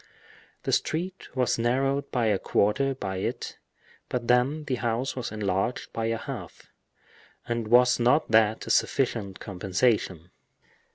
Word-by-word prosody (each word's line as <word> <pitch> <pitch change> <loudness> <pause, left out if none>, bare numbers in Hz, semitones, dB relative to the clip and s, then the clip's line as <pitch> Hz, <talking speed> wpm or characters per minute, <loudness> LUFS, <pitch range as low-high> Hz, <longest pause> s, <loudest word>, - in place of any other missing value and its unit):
The - - -1
street 180 +4 -1
was 125 -2 +1
narrowed 135 +4 +1
by 120 -2 0
a 105 -3 +2
quarter 135 +7 +1
by 95 -6 -4
it, 95 - -4 0.5
but 120 -2 -3
then 125 +5 +2
the 130 -4 -2
house 120 +2 -1
was 125 -2 -4
enlarged 100 +2 -2
by 115 0 -1
a 115 0 0
half; - - -8 0.8
and 120 -2 -2
was 125 +2 +5
not 125 +3 +3
that 110 0 +3
a - - -2
sufficient 110 -7 0
compensation? 95 -2 -1
120 Hz, 135 wpm, -27 LUFS, 105-130 Hz, 0.8 s, was